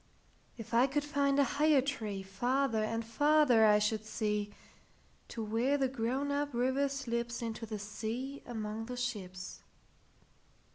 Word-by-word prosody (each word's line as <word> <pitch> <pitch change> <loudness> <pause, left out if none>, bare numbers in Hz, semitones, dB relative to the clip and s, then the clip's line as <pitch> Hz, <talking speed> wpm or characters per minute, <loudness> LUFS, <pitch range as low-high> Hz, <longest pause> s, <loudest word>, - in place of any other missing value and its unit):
If 225 0 -9
I 240 +3 +5
could 290 +2 0
find 280 -1 +1
a 285 - +6
higher 295 +1 +3
treeFarther 225 0 -1
and 225 +1 -2
farther 290 -2 +4
I 210 0 +6
should 210 +1 0
see, 210 -1 -2 0.8
To 230 - -5
where 235 +6 +1
the 270 -1 +2
grown 260 +3 -1
up 285 -2 -1
river 260 +3 +2
slipsInto 235 -4 -3
the 215 0 -4
sea 225 +7 -5
among 220 -1 -4
the 250 0 -5
ships. 190 -7 -5
235 Hz, 135 wpm, -33 LUFS, 215-275 Hz, 0.8 s, a